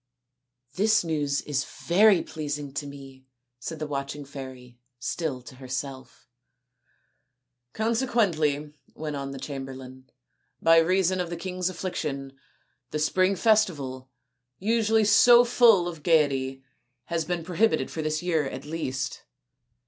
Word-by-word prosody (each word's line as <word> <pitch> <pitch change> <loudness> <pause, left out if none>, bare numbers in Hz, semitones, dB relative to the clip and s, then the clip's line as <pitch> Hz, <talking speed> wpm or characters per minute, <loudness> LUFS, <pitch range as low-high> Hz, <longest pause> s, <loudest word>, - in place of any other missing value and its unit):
" 125 0 -46
This 215 +2 +3
news 145 -4 -1
is 145 -1 -1
very 195 +1 +3
pleasing 145 -2 -5
to 145 0 -4
me," 135 -2 -12 0.3
said 160 +6 -6
the 155 - -4
watching 140 0 -4
fairy, 130 -3 -10 0.2
still 130 0 -3
to 130 - -12
herself. 130 0 -6 0.7
" 125 0 -50
Consequently," 205 - 0 0.2
went 155 -1 -4
on 140 -1 -4
the 135 - -7
chamberlain, 130 -1 -8 0.3
" - - -48
by 165 0 +6
reason 185 +2 +2
of 175 - -4
the 170 - -4
king's 180 +1 -2
affliction, 150 -7 -4 0.6
the - - -3
spring 185 +5 +2
festival, 155 - +1 0.5
usually 220 +2 +2
so 240 +4 +7
full 230 -7 +5
of 165 -3 -6
gaiety, 135 -5 +1 0.4
has 165 +4 -2
been 175 +1 -3
prohibited 185 +6 +1
for 160 - -4
this 155 +1 -2
year 160 -5 +1
at 130 +2 -8
least. 135 -5 -4
150 Hz, 135 wpm, -26 LUFS, 135-180 Hz, 0.7 s, so